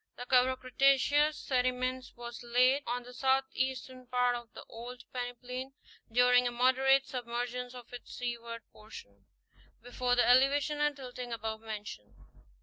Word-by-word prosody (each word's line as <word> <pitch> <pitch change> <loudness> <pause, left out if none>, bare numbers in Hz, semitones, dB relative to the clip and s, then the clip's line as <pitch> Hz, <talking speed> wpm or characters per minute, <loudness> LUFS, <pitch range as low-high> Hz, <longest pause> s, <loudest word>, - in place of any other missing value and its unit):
The 245 - -6
cover 255 0 +4
of 260 - -4
Cretaceous 275 +3 +3
sediments 255 -1 -1
was 240 0 -8
laid 250 +3 +3
on 245 +1 -2
the 250 +1 -12
southeastern 260 -1 -1
part 250 0 +2
of 240 -1 -8
the - - -9
old 240 +2 -9
peneplain 250 +1 -5 0.4
during 245 +1 +5
a - - -1
moderate 260 +2 +4
submergence 245 0 -4
of 245 -1 -12
its 245 - -9
seaward 235 -2 -5
portion, 100 - -13 0.6
before 245 0 0
the 245 - +3
elevation 275 +4 +4
and 295 -1 +2
tilting 250 -2 -7
above 220 -1 -4
mentioned 210 - -8
(fig. - - -24
250 Hz, 145 wpm, -31 LUFS, 240-260 Hz, 0.6 s, during